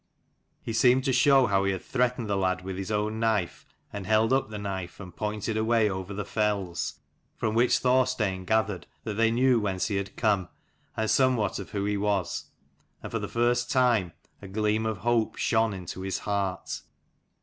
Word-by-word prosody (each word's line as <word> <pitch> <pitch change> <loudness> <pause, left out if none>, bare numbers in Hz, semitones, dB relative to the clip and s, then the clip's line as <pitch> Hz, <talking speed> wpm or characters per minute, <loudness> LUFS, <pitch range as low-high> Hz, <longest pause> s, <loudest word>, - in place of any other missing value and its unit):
He 115 - -4
seemed 125 +4 +4
to 135 -1 +1
show 135 +1 +5
how 100 -3 +2
he 95 - +1
had 95 - -6
threatened 125 -2 0
the 100 - 0
lad 95 -1 0
with 95 0 -5
his 95 +1 -5
own 105 +1 -1
knife, 110 -6 -1 0.3
and 100 -2 -6
held 110 +3 +3
up 135 -4 +1
the 105 - -6
knife, 95 -4 -5
and 90 -3 -10
pointed 105 +1 -2
away 110 -1 +2
over 95 +1 -5
the 100 0 -4
fells: 100 -5 -1 0.4
from 110 -2 -1
which 120 +2 +4
Thorstein 125 -7 +1
gathered 105 -4 0 0.2
that 110 - -3
they 115 +2 +3
knew 125 +1 +3
whence 95 -2 -1
he 100 - 0
had 100 -1 -4
come 100 -6 +1 0.5
and 110 - 0
somewhat 125 -6 +2
of 100 - -7
who 100 -1 -2
he 105 0 0
was: 100 -3 -1 0.6
and - - -6
for - - -1
the - - -4
first 120 +1 +1
time 120 -9 +2 0.3
a 100 - -9
gleam 105 +2 0
of 110 -2 -2
hope 120 +1 +1
shone 110 -1 +2
into 95 -1 -6
his 95 0 -2
heart. 100 -3 -3
105 Hz, 190 wpm, -27 LUFS, 95-115 Hz, 0.6 s, show